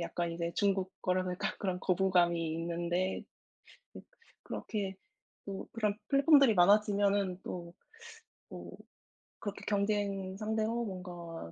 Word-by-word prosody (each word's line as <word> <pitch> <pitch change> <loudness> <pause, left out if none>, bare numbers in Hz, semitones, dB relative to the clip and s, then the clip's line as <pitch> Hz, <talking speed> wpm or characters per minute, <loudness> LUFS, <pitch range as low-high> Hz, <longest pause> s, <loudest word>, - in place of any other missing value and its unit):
약간 170 0 -2
이제 170 0 -2
중국 195 -2 +1
거라서 185 0 +1
약간 180 - -1
그런 185 -2 -1
거부감이 175 -3 +2
있는데 175 +2 -1 0.7
이 - - -8 0.4
그렇게 195 -3 -4 0.5
또 195 -1 -6
그런 210 -3 0
플랫폼들이 275 -3 +6
많아지면은 200 0 +4
또 170 -1 -6 0.8
뭐 - - -8 0.7
그렇게 205 -2 -6
경쟁 200 -2 0
상대로 220 +2 -1
뭔가 175 - -7
190 Hz, 255 characters per minute, -32 LUFS, 175-205 Hz, 0.8 s, 플랫폼들이